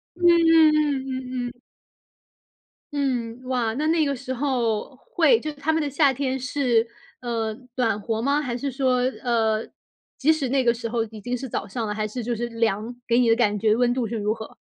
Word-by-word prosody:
嗯 360 - -10
嗯 315 -5 +5
嗯 270 - -6
嗯 255 -1 -3
嗯。 245 0 -11 1.3
嗯， 250 -4 -2
哇， 245 -3 -1
那 295 +5 -1
那 325 0 +3
个 280 -1 -1
时 255 +1 -5
候 255 -2 -1
会 485 - +3
就 305 -5 -5
他 295 +2 -2
们 320 - +1
的 290 - -2
夏 280 0 +4
天 265 0 -2
是， 250 -3 +1 0.3
呃， 225 -3 -2 0.2
暖 225 -4 +1
和 225 +2 -2
吗？ 280 +3 +2
还 245 -5 -3
是 275 +1 -3
说， 255 -1 +1 0.2
呃， 225 -3 +1 0.5
即 310 +4 +3
使 285 -5 -1
那 265 0 +1
个 235 - +4
时 230 0 -5
候 230 -1 0
已 215 -1 -10
经 245 +4 -3
是 265 +2 -6
早 220 - -4
上 225 +3 -3
了， 210 - -3
还 215 0 -2
是 235 +2 -5
就 240 +1 -1
是 240 +2 -3
凉， 230 0 -1
给 235 0 +3
你 245 - +3
的 225 - +5
感 210 -3 +2
觉 215 +1 +3
温 245 0 +2
度 245 -2 -1
是 230 - -3
如 210 0 0
何？ 220 -1 -8
245 Hz, 225 characters per minute, -24 LUFS, 230-275 Hz, 1.3 s, 嗯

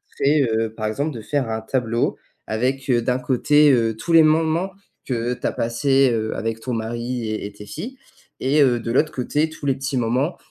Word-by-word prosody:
c'est 145 +1 +3
heu, 110 0 0
par 110 -1 -4
exemple 140 +8 -1
de 115 - -6
faire 135 +1 -1
un 110 0 -2
tableau 115 0 -1 0.3
avec 130 +5 -1
heu, 120 -2 +3
d'un 125 +2 0
côté, 145 +4 +4
heu, 115 -3 +2
tous 170 - -2
les 165 - +9
moments 160 +4 +2 0.3
que 120 -1 -1
tu - - -8
as - - 0
passé, 135 +3 +2
heu, 110 -1 -2
avec 115 0 -3
ton 125 +2 -4
mari 115 +1 -3
et 110 - -3
et - - -10
tes 105 0 -12
filles, 245 - -7 0.4
et 145 +3 +2
heu, 125 -3 +4
de 115 0 -4
l'autre 155 +5 +2
côté 150 +5 0
tous 155 -2 -10
les 135 - +3
petits 135 0 -3
moments 125 +8 0
125 Hz, 210 wpm, -22 LUFS, 115-145 Hz, 0.4 s, les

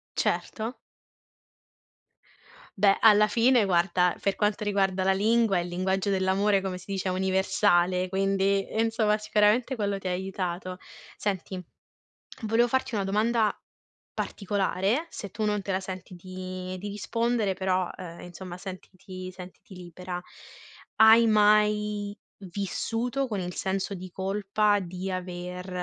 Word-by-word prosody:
Certo. 225 +3 -1 2.0
Beh, 200 0 +5
alla 210 -1 +7
fine 235 +1 +4
guarda, 180 0 +2
per 200 - +1
quanto 210 0 0
riguarda 195 -2 +1
la 190 - +4
lingua, 215 0 +3
il 175 0 -2
linguaggio 190 +3 -1
dell'amore 195 +1 +2
come 185 -1 -3
si 180 - -14
dice 190 -1 -2
è - - 0
universale, 185 -1 +2
quindi 195 +1 +1
insomma 220 -2 +2
sicuramente 210 +4 +2
quello 200 -2 -1
ti 190 - -9
ha - - 0
aiutato. 185 -1 -4 0.4
Senti, 190 -2 -3 0.8
volevo 225 +2 +3
farti 260 -1 -1
una 200 - 0
domanda 215 +2 +1 0.6
particolare, 200 - -1
se 200 - -7
tu 215 +2 -3
non 210 -1 0
te 195 - -5
la 190 - 0
senti 185 -1 -8
di 185 0 -6
di 205 +3 -6
rispondere 220 0 -1
però, 185 -1 0
ehm, 170 -2 -9
insomma 175 +1 -9
sentiti 185 0 -9
sentiti 185 +1 -12
libera. 180 0 -7 0.8
Hai 225 +1 +7
mai 210 -1 +3 0.2
vissuto 225 +7 -2
con 205 -4 -2
il 180 0 -5
senso 195 +1 -2
di 185 0 -8
colpa 205 +2 +1
di 185 +1 -5
aver 180 0 -5
195 Hz, 130 wpm, -27 LUFS, 185-210 Hz, 2.0 s, alla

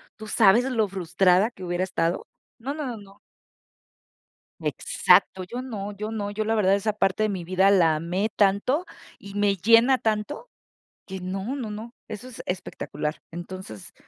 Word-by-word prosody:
¿tú 215 - -10
sabes 215 +2 +5
lo 230 -5 +1
frustrada 185 +3 +2
que 190 - -12
hubiera 175 +1 -1
estado?, 170 -2 -1 0.3
no, 265 +4 -4
no, 300 -2 -4
no, 235 - -5
no. 200 -1 -15 1.4
Exacto, 185 -1 +2
yo 240 +7 -6
no, 210 -5 -5
yo 210 +2 -5
no, 205 -2 -3
yo 215 +1 -2
la 225 - +1
verdad 195 -2 +3
esa 205 +1 0
parte 210 +1 +1
de - - +1
mi 185 -4 -3
vida 185 +3 +3
la 165 -5 +4
amé 180 +7 -1
tanto 210 - +2 0.3
y 200 0 -11
me 205 -1 +2
llena 230 +7 +5
tanto 220 - -2 0.6
que 190 0 -6
no, 195 +7 -4
no, 250 -6 -4
no, 220 +3 -7
eso 215 +4 -7
es 255 - -9
espectacular. 150 -4 -4
Entonces, 175 - -8
200 Hz, 165 wpm, -25 LUFS, 185-225 Hz, 1.4 s, sabes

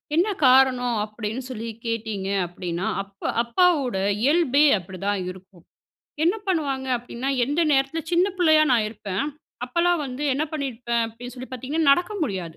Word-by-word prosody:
என்ன 350 +6 +3 0.2
காரணம்? 255 -2 +4
அப்படின்னு 215 +3 -5
சொல்லி 230 -2 -5 0.2
கேட்டிங்க 220 -4 -3 0.2
அப்படின்னா, 175 0 -4 0.2
அப்ப 195 0 -26 0.2
அப்பாவோட 270 - +2 0.3
இயல்பே 290 -1 +4
அப்படிதான் 190 +2 -3
இருக்கும். 185 -2 -16 0.6
என்ன 355 +5 +3
பண்ணுவாங்க? 280 -7 -1
அப்படின்னா, 245 +3 -4 0.2
எந்த 290 +4 0
நேரத்தில 275 +4 +1
சின்ன 355 +3 +4
பிள்ளையா 315 -3 +5
நான் 225 -3 +3
இருப்பேன் 205 +1 -3 0.4
அப்பலாம் 340 +5 +1
வந்து 255 +2 -6
என்ன 300 +3 0
பண்ணியிருப்பேன் 240 -5 -2
அப்படின்னு 245 +2 -10
சொல்லி 255 +1 -8
பார்த்தீங்கன்னா, 280 +4 +1
நடக்க 355 +6 0
முடியாது. 185 - -3
250 Hz, 140 wpm, -24 LUFS, 215-295 Hz, 0.6 s, பிள்ளையா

